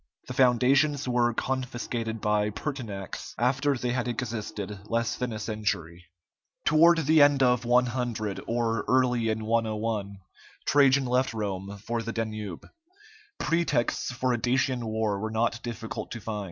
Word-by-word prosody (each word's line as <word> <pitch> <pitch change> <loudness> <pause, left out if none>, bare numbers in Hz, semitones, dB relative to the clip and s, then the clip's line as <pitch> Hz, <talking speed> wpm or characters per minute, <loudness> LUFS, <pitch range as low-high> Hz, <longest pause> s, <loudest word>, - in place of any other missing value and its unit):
The 125 - -5
foundations 135 +3 +3
were 120 -1 +2
confiscated 120 -3 -3
by 105 0 +1
Pertinax, 105 -5 -6
after 130 +3 +1
they 120 0 -2
had 125 0 -1
existed 110 -4 -4
less 115 0 0
than 125 -1 -3
a 110 - -4
century. 100 -6 -3 0.6
Toward 165 +2 +6
the 155 +1 +5
end 145 -1 +5
of 125 -1 +3
100, 120 -4 0
or 115 -2 0
early 125 -3 +2
in 110 0 -2
101, 110 -2 -1 0.5
Trajan 140 -1 +4
left 125 -1 +1
Rome 100 -1 -4
for 115 0 -1
the 115 +1 -4
Danube. 110 -5 -4 0.7
Pretexts 165 -8 0
for 125 0 0
a 120 - -1
Dacian 125 0 +1
war 110 -2 -1
were 110 +2 -3
not 115 +1 0
difficult 115 -1 -5
to 115 - -6
find. 110 -1 -4
120 Hz, 140 wpm, -27 LUFS, 110-125 Hz, 0.7 s, Toward